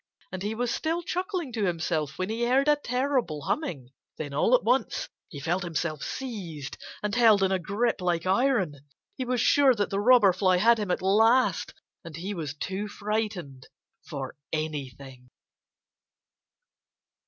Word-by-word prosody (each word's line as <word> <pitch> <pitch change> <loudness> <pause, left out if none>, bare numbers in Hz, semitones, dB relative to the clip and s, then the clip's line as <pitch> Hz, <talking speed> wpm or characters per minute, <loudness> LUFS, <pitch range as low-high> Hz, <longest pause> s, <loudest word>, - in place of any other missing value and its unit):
And 185 - -5
he 210 +3 -2
was 240 +1 -1
still 330 +2 -1
chuckling 360 - -3
to 220 -3 0
himself 160 -4 -1
when 185 - -2
he 225 +3 -2
heard 265 +4 +3
a 295 - +6
terrible 255 - -1
humming. 145 - -3 0.3
Then 145 -3 -5
all 190 - +4
at - - +1
once 245 +2 +1 0.2
he 145 - -8
felt 170 +6 -1
himself 165 -3 -3
seized 180 - -5 0.3
and 210 -1 -1
held 225 -5 +5
in 190 - +2
a 190 - +1
grip 205 +5 -1
like 175 -1 0
iron. 195 - +2 0.4
He 260 - -3
was 250 0 0
sure 270 +2 +5
that 205 -2 -1
the 195 - 0
Robber 215 -3 +6
Fly 185 -1 +3
had 230 +4 +4
him 205 -3 -3
at 180 - -1
last. 225 +6 +3 0.3
And 165 -3 -9
he 185 +6 -4
was 155 -6 -5
too 195 +6 -4
frightened 205 - -4 0.4
for 135 -4 -6 0.2
anything. 135 -5 -5
200 Hz, 160 wpm, -27 LUFS, 160-245 Hz, 0.4 s, a